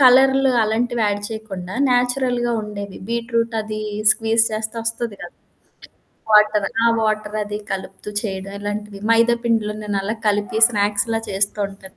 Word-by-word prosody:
కలర్లు 265 +1 +6
అలాంటివి 235 +2 0
యాడ్ 205 0 0
చేయకుండా 195 -4 -7 0.2
న్యాచురల్‌గా 245 -1 +1
ఉండేవి. 200 -2 -7
బీట్‌రూట్ 230 0 -1
అది 215 0 -5 0.3
స్క్వీజ్ 225 0 +2
చేస్తే 220 +1 -3
ఒస్తది 230 -2 -3
కదా! 175 - -9 1.0
వాటర్. 210 -1 +5 0.2
ఆ! - - +6
వాటర్ 215 -1 -1
అది 205 0 -4
కలుపుతూ 195 +1 -5
చేయడం 195 -1 -5
ఇలాంటిది. 205 0 -5
మైదా 230 +1 +4
పిండిలో 220 -2 +1
నేనలా 205 +1 -2
కలిపి 205 +1 0
స్నాక్స్‌లా 210 +1 0
చేస్తూ 200 +2 -1
ఉంటాను. 195 -1 -14
215 Hz, 130 wpm, -21 LUFS, 205-230 Hz, 1.0 s, కలర్లు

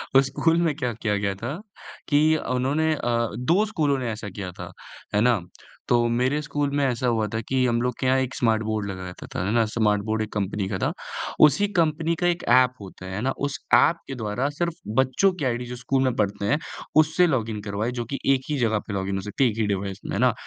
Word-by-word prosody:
उस 135 - +7
स्कूल 165 +5 +1
में 160 -4 +1
क्या 125 -4 -2
किया 105 -2 -1
गया 100 -1 -1
था 120 - -5 0.5
कि 155 +2 +4
उन्होंने 145 +5 0
अ, 120 -3 0
2 175 +12 +3
स्कूलों 150 -9 0
ने 120 -3 -2
ऐसा 110 -1 -6
किया 95 -1 -6
था, - - -9 0.4
है 105 - +3
ना? 120 -4 +3 0.5
तो 120 -1 +4
मेरे 130 +5 +1
स्कूल 145 -1 -1
में 145 - +2
ऐसा 125 -1 0
हुआ 115 -2 +1
था 110 - 0
कि 130 -1 +2
हम 120 -1 +1
लोग 125 0 0
के - - -2
यहाँ 130 +1 +4
एक 130 0 -2
स्मार्ट 110 -2 +1
बोर्ड 110 -2 -2
लगा 95 -1 -6
रहता 90 0 -9
था, 90 - -1
है 100 - 0
ना, 115 -2 +3
स्मार्ट 105 -2 +1
बोर्ड 110 0 -1
एक 110 - -4
कंपनी 100 -1 -2
का 95 - -2
था। - - 0 0.5
उसी 150 +8 +3
कंपनी 160 +1 +1
का 175 - +3
एक 175 0 0
ऐप 125 0 +5
होता 95 -1 -10
है, 95 - -6
है 105 - -3
ना, 135 +3 +1
उस 145 0 -3 0.2
ऐप 170 - +5
के 135 - -5
द्वारा 120 +4 -2
सिर्फ 170 +3 -2 0.3
बच्चों 130 +9 +3
की 155 -7 -4
आईडी 120 0 -1
जो 125 - -6
स्कूल 130 +2 0
में 130 -2 +1
पढ़ते 100 -1 -1
हैं, 110 - +2 0.4
उससे 155 +3 +4
लॉगिन 115 -8 -1
करवाए 105 +3 -2
जो 120 - -2
कि 135 +4 -4
एक 130 - 0
ही 150 - 0
जगह 110 -3 +2
पे 105 - -4
लॉगिन 95 0 -2
हो 95 - -2
सकती 105 +7 -1
है, - - +4
एक 110 - -9
ही 110 - +1
डिवाइस 100 -1 -2
में, - - -4
है - - -1
ना? - - +4
120 Hz, 250 wpm, -24 LUFS, 105-145 Hz, 0.5 s, उस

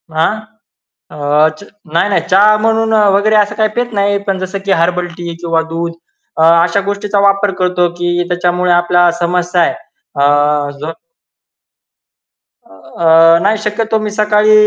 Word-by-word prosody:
हां? 160 +6 +1 0.8
अ, 150 +1 +1
च - - -12 0.3
नाही, 180 +5 +1
नाही. 200 - +1
चहा 205 +3 +4
म्हणून 225 0 0 0.2
वगैरे 215 +1 +1
असं 210 -1 +1
काही 215 0 +1
पीत 240 -1 -2
नाही. 200 0 0
पण 190 -1 -1
जसं 185 +1 -5
की 195 - -1
हर्बल 180 0 -1
टी 170 -1 -6
किंवा 165 -1 0
दूध 170 0 -3 0.4
अ, 160 - +2 0.2
अशा 180 +3 0
गोष्टीचा 200 +1 -2
वापर 200 0 +2
करतो 180 -1 +1
की 175 0 -1
त्याच्यामुळे 180 0 0
आपला 175 0 +3
समस्या 175 0 0
आहे - - +1 0.4
अ, 145 +1 +1
जो 155 +2 -5 1.7
अ, 130 - -9 0.4
नाही 215 +2 +1
शक्यतो 220 +1 -1
मी 215 0 -3
सकाळी 210 0 +3
180 Hz, 145 wpm, -13 LUFS, 170-210 Hz, 1.7 s, चहा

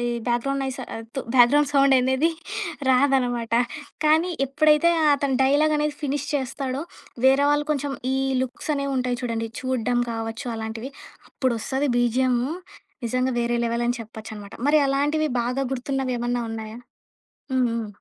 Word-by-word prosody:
ఈ - - -2 0.3
background 275 +4 0
noise 265 -1 -4 0.3
తు 270 - -1
background 275 +4 +5
sound 275 -1 +5
ఏందది 260 +5 +2 0.6
రాదనమాట. 250 -3 +2 0.5
కానీ 320 +4 +4 0.2
ఎప్పుడైతే 300 +4 +4 0.2
అతను 280 -2 0
డైలాగనేది 300 +2 +2
ఫినీష్ 285 0 -2
చేస్తాడో. 270 0 -2 0.4
వేరే 270 +2 +5
వాళ్ళు 290 0 +1
కొంచెం 280 -1 -2 0.2
ఈ - - +1 0.3
లుక్సనేవి 280 +2 -3
ఉంటాయి 250 -1 -1
చూడండి. 230 -2 -2
చూడ్డం 250 -1 0
కావచ్చు 225 +3 -4
అలాంటివి. 225 +3 -5 0.4
అప్పుడొస్తది 260 +3 -1
బీజీఎమూ 245 +1 +2 0.6
నిజంగా 255 +2 0
వేరే 240 0 0
లెవెల్ 235 +1 0
అని 245 - 0
చెప్పొచ్చనమాట. 220 -2 -9
మరి 305 +1 +5
అలాంటివి 295 +3 +1
బాగా 250 +3 -1
గుర్తున్నవి 265 0 -2
ఏమన్నా 240 0 -1
ఉన్నాయా? 220 0 -6 0.8
హ్మ్. 255 -1 +3
హ్మ్. 230 -1 -3
260 Hz, 130 wpm, -24 LUFS, 240-280 Hz, 0.8 s, background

